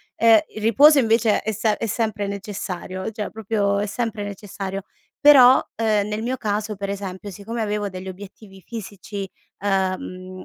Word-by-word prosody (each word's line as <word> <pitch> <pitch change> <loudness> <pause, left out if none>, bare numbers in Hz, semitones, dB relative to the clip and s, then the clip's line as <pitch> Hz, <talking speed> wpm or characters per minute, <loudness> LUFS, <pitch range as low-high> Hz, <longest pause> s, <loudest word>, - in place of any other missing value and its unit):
Ehm, 225 -1 +6 0.2
il 215 - -6
riposo 280 +8 +6
invece 225 -2 +3
è 220 - -2
se 215 0 0
è - - -3
sempre 215 -2 -1
necessario, 195 -1 -5
cioè 210 -1 -4
proprio 205 -2 -1
è 205 - 0
sempre 220 0 -3
necessario. 195 -1 -6 0.4
Però, 265 -3 +8
ehm, 215 -2 +1
nel 210 +1 -3
mio 250 +2 -1
caso 210 0 -2
per 200 0 -4
esempio, 200 0 -5
siccome 215 +4 -5
avevo 210 -1 -1
degli 185 0 -8
obiettivi 195 +1 -11
fisici, 200 -3 -7 0.3
ehm, 185 -1 -2
205 Hz, 155 wpm, -22 LUFS, 195-220 Hz, 0.4 s, Però